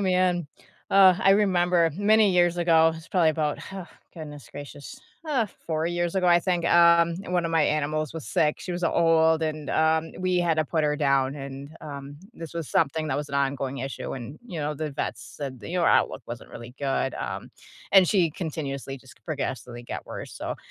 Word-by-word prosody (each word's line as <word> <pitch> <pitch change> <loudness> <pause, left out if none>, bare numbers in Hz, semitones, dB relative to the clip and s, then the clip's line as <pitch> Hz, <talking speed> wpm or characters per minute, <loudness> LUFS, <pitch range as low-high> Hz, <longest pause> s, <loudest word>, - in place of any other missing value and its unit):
man. 180 -3 +1 0.4
Ah, 190 -2 +6
I 195 - +5
remember 180 -4 +3
many 210 +2 +4
years 175 -1 +3
ago, 165 -2 +4
it 165 - -3
was 160 +1 -12
probably 170 -4 +3
about, 155 -1 -1
huh, 190 -2 -8 0.3
goodness 145 - -9
gracious, 145 0 -9 0.3
ah, 255 -9 0 0.2
4 160 0 -1
years 175 0 -1
ago, 185 -2 +1
I 175 0 +6
think, 175 -1 -1
um, 170 -1 +5
and 180 - -6
one 175 -2 +1
of - - -4
my 165 -2 +3
animals 155 0 0
was 160 -2 -7
sick, 155 -4 +1
she 180 - -5
was 175 0 -2
old, 160 -1 +3
and, 155 -2 -3
um, 160 0 +1
we 185 -1 +1
had 170 -2 +1
to 155 - +1
put 160 -1 0
her 150 - +1
down, 140 -2 +1
and, 140 0 -8
um, 140 -1 -8 0.2
this 165 -2 -8
was 165 -3 -5
something 155 +2 +1
that - - -1
was 145 0 -4
an 140 - -5
ongoing 135 -1 -1
issue 135 0 -5
and, 135 +3 -7
you 175 -9 -5
know, 150 +1 -2
the 150 0 -4
vets 140 - -5
said, 135 -4 -6
the - - -9
you 180 - -1
know, 170 - +2
her - - +5
outlook - - +2
wasn't - - -8
really 120 +1 -10
good, 135 -2 -1
um, - - -5 0.4
and 190 -2 +7
she 180 -4 +2
continuously 140 -5 -5
just 130 0 -17
progressively 130 -5 -4
got - - -6
worse. - - -8
So, - - -5
160 Hz, 210 wpm, -26 LUFS, 145-175 Hz, 0.4 s, and